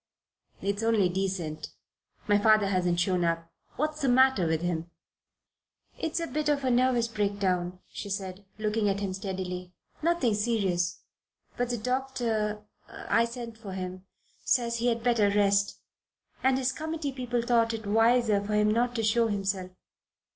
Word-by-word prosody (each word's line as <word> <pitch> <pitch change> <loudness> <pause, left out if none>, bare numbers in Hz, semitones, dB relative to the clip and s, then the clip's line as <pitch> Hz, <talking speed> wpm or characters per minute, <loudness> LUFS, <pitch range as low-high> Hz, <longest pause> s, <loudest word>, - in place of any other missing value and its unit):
"It's 200 +1 -1
only 225 -5 +3
decent. 180 -5 -3 0.6
My 205 0 +4
father 215 0 +5
hasn't 180 -2 +1
shown 180 0 +1
up. 165 0 -1 0.2
What's 305 +1 -2
the 270 - +2
matter 260 -7 +4
with 160 +1 0
him?" 170 -1 -2 1.1
"It's 325 +1 -1
a 335 - -1
bit 305 -2 -1
of 285 -2 +1
a 260 - +2
nervous 245 -1 +3
breakdown," 200 -5 -1
she 200 - -7
said, 195 0 -4
looking 215 -1 0
at 195 0 0
him 195 -2 -2
steadily. 185 -2 -5 0.3
"Nothing 325 -8 +2
serious. 195 -5 0 0.5
But 245 0 -1
the 240 - -1
doctor 230 -4 -1 0.3
I 230 - +1
sent 235 -1 -7
for 200 -4 -7
him 185 0 -6 0.4
says 235 -2 +1
he 235 +1 0
had 230 -1 0
better 230 -4 +3
rest 200 0 +2 0.6
and 260 0 +3
his 265 0 +1
committee 315 -1 -3
people 245 -2 -2
thought 230 -1 +3
it 225 -1 -5
wiser 225 0 +3
for 210 +1 -2
him 210 0 +3
not 240 +2 +1
to 225 - -1
show 230 +2 +3
himself." 195 -3 -2
215 Hz, 155 wpm, -28 LUFS, 190-240 Hz, 1.1 s, father